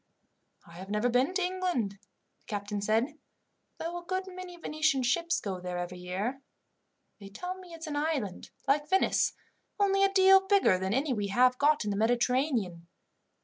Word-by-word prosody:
"I 170 - -14
have 190 +2 -9
never 210 +4 +1
been 250 +6 +2
to 375 - +1
England," 360 - -1
the 200 0 -25
captain 205 0 -3
said, 230 +9 0 0.6
"though 345 +2 -4
a - - -19
good 370 +2 -2
many 365 -1 -9
Venetian 310 -4 0
ships 335 +8 +1
go 190 -4 -4
there 180 0 -5
every 175 0 -5
year. 195 +9 -3 0.8
They 200 -1 -10
tell 360 - -5
me 360 -2 -12
it's 325 0 -8
an 300 -2 -4
island, 290 - -2 0.2
like 295 +2 +2
Venice, 380 - +2 0.5
only 390 -1 +3
a 395 - +4
deal 385 0 +6
bigger 385 - +4
than 190 +1 -2
any 270 +1 +1
we 205 -3 -2
have 250 +5 +3
got 295 -4 +3
in 205 - -1
the 200 - -2
Mediterranean. 235 - 0
260 Hz, 175 wpm, -29 LUFS, -, 0.8 s, deal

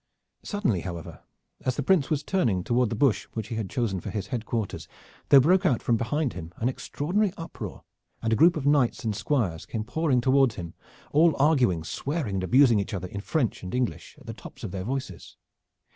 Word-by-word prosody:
Suddenly, 205 - -1
however, 85 -2 -7 0.4
as 130 - 0
the 145 - -2
Prince 165 -3 +3
was 150 -2 0
turning 115 - +1
toward 120 +2 +1
the 115 - -2
bush 125 0 +2
which 110 -1 -5
he 115 - -3
had 110 -4 -3
chosen 115 -8 -1
for - - -6
his 105 -4 -4
headquarters, 115 -4 -3 0.4
there 140 - +9
broke 180 +8 +4
out 135 - +1
from 120 - +2
behind 130 +5 -1
him 85 -2 -8
an 115 - 0
extraordinary 180 +10 -1
uproar 165 - -7 0.4
and 115 0 0
a - - +4
group 165 +6 +5
of 145 - -4
knights 140 -4 +2
and 110 -3 -1
squires 95 - -1
came 110 -2 -3
pouring 150 +1 +1
toward 130 -1 +3
him, 85 -5 -7 0.4
all 160 +2 +4
arguing, 130 - +3
swearing 115 - -3
and 95 - -2
abusing 120 +2 +5
each 100 +1 -3
other 90 -1 -5
in 100 - -5
French 125 +1 -1
and 90 +3 -5
English 125 -2 -3
at - - -17
the - - -6
tops - - -12
of - - -4
their 95 -1 -4
voices. 130 -8 -5
120 Hz, 205 wpm, -26 LUFS, 100-145 Hz, 0.4 s, there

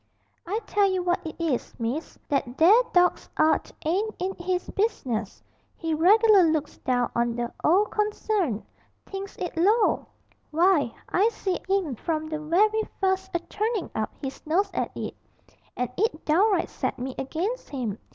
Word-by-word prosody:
'I 420 +5 -1
tell 405 -1 +3
you 370 -1 0
what 350 0 0
it 315 - -6
is, 315 -7 -1
miss: 245 +7 -3
that 270 -3 -1
there 395 +9 +7
dawg's 360 0 +3
'art 315 - +2
ain't 400 +7 0
in 375 +1 -2
his 360 +1 -1
business 255 - -2 0.3
he 325 -1 -2
reg'lar 410 +6 +6
looks 305 -2 -2
down 245 -2 0
on 235 0 0
the 240 0 -3
'ole 375 +7 +5
concern, 420 - -1 0.4
thinks 390 0 -7
it 355 - -4
low! 410 +6 +3 0.4
Why, 325 -5 +3 0.2
I 405 +5 +3
see 385 -5 -2
'im 380 -8 +1
from 310 +6 -2
the 310 -1 -3
werry 420 +8 +3 0.2
fust 380 0 +1
a - - +3
turnin' 425 +2 -2
up 215 - -2
his 270 0 -5
nose 390 +5 +2
at - - -1
it, - - -4 0.6
and 250 -1 -1
it 390 -6 0
downright 370 +4 +3
set - - -2
me 255 +1 -4
against 345 - -3
him. 235 -7 -3
350 Hz, 160 wpm, -26 LUFS, 290-400 Hz, 0.6 s, there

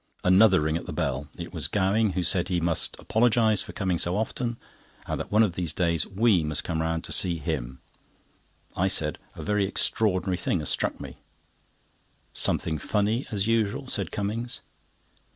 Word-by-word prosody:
Another 95 0 +5
ring 80 +1 0
at - - -8
the - - -5
bell; 70 +1 -2
it 85 0 -8
was 80 -5 -2
Gowing, 100 +3 +1
who 90 - -1
said 90 0 +2
he 90 -2 +1
"must 85 0 -1
apologise 110 -2 +2
for - - -7
coming 95 -5 -1
so 90 +1 +1
often, 115 +2 -2 0.5
and - - -3
that - - -6
one 110 +2 +5
of 100 -6 0
these 85 -4 -2
days 85 -3 0
we 100 -3 +2
must 75 -1 -2
come 80 -2 -2
round 80 0 -1
to 95 - +5
him." 65 -4 -4 0.9
I 95 - +1
said: 75 -6 0 0.2
"A - - -7
very 105 -1 +1
extraordinary 95 -3 0
thing 95 - 0
has 75 -3 -2
struck - - -1
me." - - -9 1.2
"Something 80 -1 +2
funny, 105 - 0
as 100 -2 -1
usual," 115 +4 0
said 100 -9 -4
Cummings. 115 +4 -3
95 Hz, 170 wpm, -26 LUFS, 80-110 Hz, 1.2 s, Another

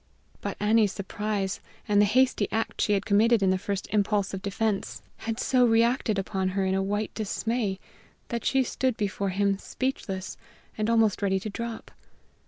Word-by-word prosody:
But - - -4
Annie's 210 -1 +3
surprise 200 0 -3 0.3
and 205 -1 +4
the - - +6
hasty 255 -1 +3
act 225 +1 -1
she 210 - +2
had 200 -1 0
committed 215 +1 +4
in 190 - +4
the 185 - +1
first 200 -1 -3
impulse 205 -1 +1
of 190 - -4
defense 200 +1 -2
had 225 0 -4
so 255 -1 +3
reacted 230 -1 +3
upon 190 -1 -1
her 195 - +2
in 190 - +1
a 195 - +1
white 205 +2 -2
dismay 220 -1 -1 0.5
that 235 -2 -3
she 265 0 +3
stood 255 -1 -1
before 200 -1 -1
him 195 +1 +1
speechless 195 -9 -4 0.4
and 215 +1 -1
almost 225 -3 +3
ready 195 -1 +1
to 215 - -5
drop. 230 +2 -6
210 Hz, 175 wpm, -27 LUFS, 195-225 Hz, 0.5 s, the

